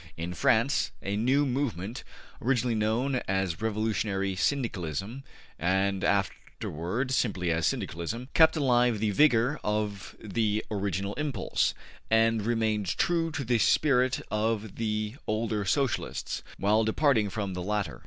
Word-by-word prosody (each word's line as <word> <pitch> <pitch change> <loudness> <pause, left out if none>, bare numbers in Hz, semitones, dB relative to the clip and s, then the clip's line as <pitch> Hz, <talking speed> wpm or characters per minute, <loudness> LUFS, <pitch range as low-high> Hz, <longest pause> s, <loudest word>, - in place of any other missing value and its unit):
In 85 +2 -4
France 115 - +2
a 100 - -2
new 130 +7 +2
movement, 120 -6 -2 0.4
originally 125 -1 +1
known 115 +5 0
as 95 -2 -1
Revolutionary 105 -3 -1
Syndicalism 105 - -2 0.4
and 95 +3 +1
afterward 100 - -2
simply 95 -9 0
as 80 -1 +1
Syndicalism 85 - -3
kept 160 0 +5
alive 125 -5 +3
the 105 0 +1
vigor 130 +3 +3
of 105 -2 -2
the 110 0 -1
original 100 -1 -2
impulse, 140 -10 0 0.3
and 115 -1 +3
remained 110 -3 0
true 165 -1 +1
to 145 - -3
the 120 -1 +1
spirit 130 +3 +3
of 110 -1 -1
the 110 +1 -2
older 110 -1 -1
Socialists, 135 +6 -1 0.2
while 105 +3 +3
departing 110 -2 +2
from 100 -1 -3
the 90 - -4
letter. 100 -8 -2
110 Hz, 125 wpm, -28 LUFS, 100-125 Hz, 0.4 s, kept